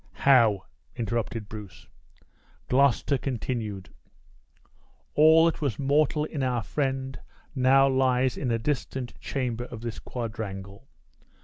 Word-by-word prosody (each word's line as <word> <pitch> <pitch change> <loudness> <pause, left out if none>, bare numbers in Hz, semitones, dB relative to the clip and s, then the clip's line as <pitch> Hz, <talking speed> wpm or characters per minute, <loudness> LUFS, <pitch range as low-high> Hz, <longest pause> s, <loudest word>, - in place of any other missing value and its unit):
"How?" 115 -8 +4 0.3
interrupted 115 -1 -3
Bruce. 105 -3 -10 0.8
Gloucester 140 +1 +3
continued: 115 -7 -4 1.2
"All 160 +2 +6
that 165 - 0
was 135 -9 -1
mortal 150 +2 +2
in 150 -2 -5
our 125 -3 0
friend 135 +1 -2 0.3
now 135 0 +5
lies 130 -1 +2
in 130 - -2
a 115 - +1
distant 130 0 -3
chamber 120 -3 -3
of 120 -3 -9
this 115 -2 -5
quadrangle. 105 -2 -6
125 Hz, 110 wpm, -27 LUFS, 115-135 Hz, 1.2 s, All